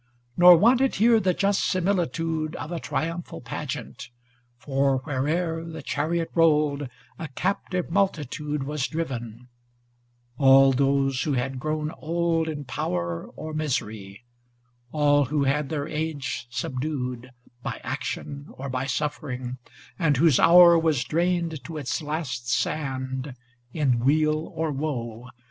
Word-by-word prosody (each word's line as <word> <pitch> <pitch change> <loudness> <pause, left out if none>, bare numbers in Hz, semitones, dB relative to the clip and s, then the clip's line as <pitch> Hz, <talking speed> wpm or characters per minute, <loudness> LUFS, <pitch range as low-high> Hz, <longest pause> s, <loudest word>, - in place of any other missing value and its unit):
Nor 175 +1 +9
wanted 250 +7 +4
here 225 +2 +5
the 185 -4 +1
just 200 0 +1
similitude 165 -4 -1
Of 155 +3 -6
a 170 - -3
triumphal 165 +4 -4
pageant, - - -6 0.5
for, 135 +1 +1
where'er 160 +4 -1
The 165 -1 -8
chariot 165 +1 -1
rolled, 150 -4 +2 0.3
a 160 - -4
captive 180 +3 -2
multitude 150 -6 -1
Was 145 -1 -2
driven; 125 -7 -5 0.9
ŌĆö - - -3
all 135 0 +7
those 135 0 +1
who 150 - 0
had 130 +1 -2
grown 155 +2 -2
old 165 0 0
in 145 -2 -5
power 85 -8 -3
120 - - -8
Or 155 - -5
misery; 110 -8 -3 0.7
all 145 -1 +3
who 145 +2 0
had 140 +1 0
their 150 -2 -2
age 150 -6 -3
subdued 125 0 -4 0.3
By - - -5
action 140 0 -5
or 135 +1 -6
by 130 +1 -2
suffering, 130 -3 -3 0.4
and 150 -6 +2
whose 150 -3 +4
hour 170 -1 +8
Was 160 -6 +1
drained 170 -3 -1
to 165 -2 -6
its 145 +1 -2
last 145 -6 -4
sand 130 -1 -2 0.4
in 135 -6 +1
weal 155 +4 +1
or 160 -1 -1
woe. 125 -5 -4
150 Hz, 130 wpm, -25 LUFS, 130-165 Hz, 0.9 s, Nor